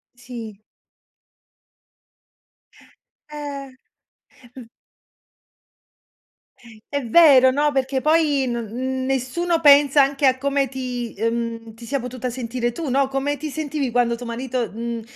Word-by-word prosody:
Sì. 235 -4 -9 2.7
Eh. 285 -2 -7 0.9
M 240 -3 -11 2.2
È 285 - -1
vero, 260 -1 +6
no, 295 +2 +1
perché 265 0 0
poi 300 -2 +2
no 240 -1 -2
n 260 +4 -4
nessuno 270 +7 -1
pensa 285 -2 +6
anche 275 +1 0
a 260 -1 +4
come 275 0 0
ti, 250 -2 -5
uhm, 230 0 -3
ti 230 +2 -12
sia 275 +4 -2
potuta 250 0 -5
sentire 240 0 -3
tu, 310 +5 -6
no, 270 +1 +1
come 275 +2 -1
ti 305 +2 -6
sentivi 295 -3 -3
quando 235 0 +1
tuo 245 +1 -9
marito, 245 0 -3
mhmm, 230 +1 -5
260 Hz, 120 wpm, -22 LUFS, 235-280 Hz, 2.7 s, vero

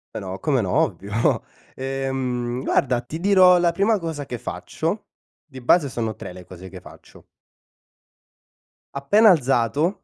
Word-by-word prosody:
Però, 95 0 -5
come 140 -5 +1
no, 95 - -3
ovvio. 100 +4 0 0.3
Ehm, 130 -2 -3
guarda, 125 -2 +1
ti 160 +5 -7
dirò 185 -1 +5
la 175 -1 +2
prima 200 +5 +1
cosa 160 -6 -5
che 120 - -5
faccio 165 - -4 0.4
di 130 -4 -12
base 140 +3 +3
sono 115 -3 -3
3 90 - -9
le 90 -1 -12
cose 95 +1 -11
che 95 - -10
faccio. - - -16 1.7
Appena 205 +11 +4
alzato, 140 - +1
135 Hz, 140 wpm, -22 LUFS, 120-170 Hz, 1.7 s, dirò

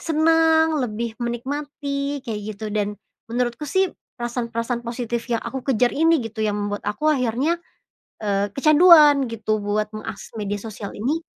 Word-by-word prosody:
senang, 320 0 +3
lebih 225 0 -4
menikmati, 280 +3 -3
kayak 215 -3 -4
gitu, 215 +1 -6
dan 210 -1 0 0.4
menurutku 240 +3 -1
sih 380 +4 +2 0.3
perasaan-perasaan 240 0 -3
positif 235 0 -4
yang 230 - +2
aku 255 +2 -5
kejar 245 +2 +2
ini, 325 +1 +4
gitu, 225 0 -6
yang 210 -1 0
membuat 205 0 -3
aku 300 +9 -2
akhirnya, 270 +6 0 0.6
eee, 200 -1 0
kecanduan 300 -2 +7
gitu 215 -1 -1
buat 210 +1 0
mengakses 215 -1 -7
media 205 0 -2
sosial 210 -2 -7
ini 295 +10 -1
240 Hz, 145 wpm, -22 LUFS, 215-295 Hz, 0.6 s, kecanduan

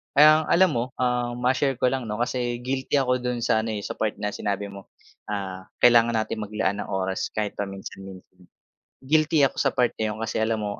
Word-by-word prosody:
Ang 155 +2 +6
alam 185 0 +4
mo, 120 -4 0
um, 125 -1 0
ma-share 130 +2 +2
ko 125 +1 +1
lang 130 -3 -3
'no, 105 - -3
kasi 120 -1 -2
guilty 130 +2 -2
ako 125 -2 +2
dun 125 -1 -3
sa 110 -2 +3
ano, 110 0 -2
eh, 100 - -5
sa - - -6
part 110 -1 0
na 105 0 -3
sinabi 100 0 -3
mo. 100 -1 -11 0.4
Ah, 95 -2 -5 0.2
kailangan 120 -1 +6
natin 110 0 -1
maglaan 105 -2 -2
ng - - -4
oras 95 0 -2
kahit 105 -1 -1
paminsan-minsan. 95 -2 -8 0.6
Guilty 155 +2 +3
ako 135 - +1
sa - - +1
part 125 -1 +2
na 110 - +1
'yon, 105 0 -4
kasi 115 - -2
alam 110 -1 0
mo 105 0 -4
115 Hz, 205 wpm, -25 LUFS, 100-125 Hz, 0.6 s, Ang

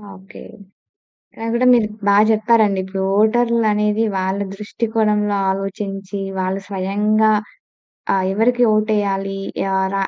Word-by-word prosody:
Okay. 190 +1 -14 1.0
నాగూడా 230 +2 0
మీరు 225 -3 +2 0.2
బా 200 - +4 0.2
చెప్పారండి. 215 -2 +2
ఇప్పుడు 190 0 -5 0.2
ఓటర్లు 230 +2 +2
అనేది 210 +1 +1
వాళ్ళ 190 +1 -2
దృష్టికోణంలో 210 -1 -1
ఆలోచించి, 195 0 -5 0.2
వాళ్ళు 185 +1 -2
స్వయంగా 205 +3 +1 0.8
ఆహ్, 190 -1 +1
ఎవరికి 245 +5 +2
ఓటేయాలి. 200 -2 -1 0.3
యార 190 0 -1
210 Hz, 100 wpm, -19 LUFS, 195-220 Hz, 1.0 s, బా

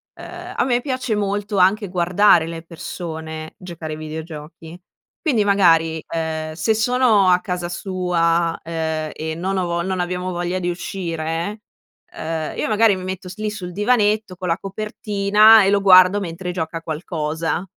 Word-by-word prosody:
uhm, - - -9
a - - +2
me 245 -1 +1
piace 255 -4 -2
molto 205 0 -2
anche 195 +2 +3
guardare 180 -1 +3
le 165 0 -7
persone 160 -2 -7
giocare 170 -4 -7
ai 155 - -7
videogiochi. 160 +2 -8 0.4
Quindi 250 - +2
magari, 165 -5 +3
uhm, 160 -1 -3
se 175 +7 +1
sono 220 -4 +3
a 180 0 +5
casa 180 -3 -3
sua, 170 -2 0
ehm, 160 -1 -3
e 160 0 -4
non 190 +3 -2
ho 185 - 0
vo 170 0 -1
non 190 0 -2
abbiamo 180 +1 -2
voglia 175 +1 -2
di 175 -1 -1
uscire, 170 +2 -4 0.5
ehm, 160 -1 -4
io - - -1
magari 215 -2 +4
mi 185 - -7
metto 185 0 -5
s 185 - -9
lì 215 0 -2
sul 180 -4 -7
divanetto 210 -2 +1
con 180 0 -5
la 165 +1 +1
copertina 210 +1 +4
e 195 - +3
lo 200 0 +2
guardo 185 +1 +7
mentre 180 -1 -5
gioca 165 -1 -3
a - - -7
qualcosa 160 +1 -3
180 Hz, 165 wpm, -20 LUFS, 165-200 Hz, 0.5 s, guardo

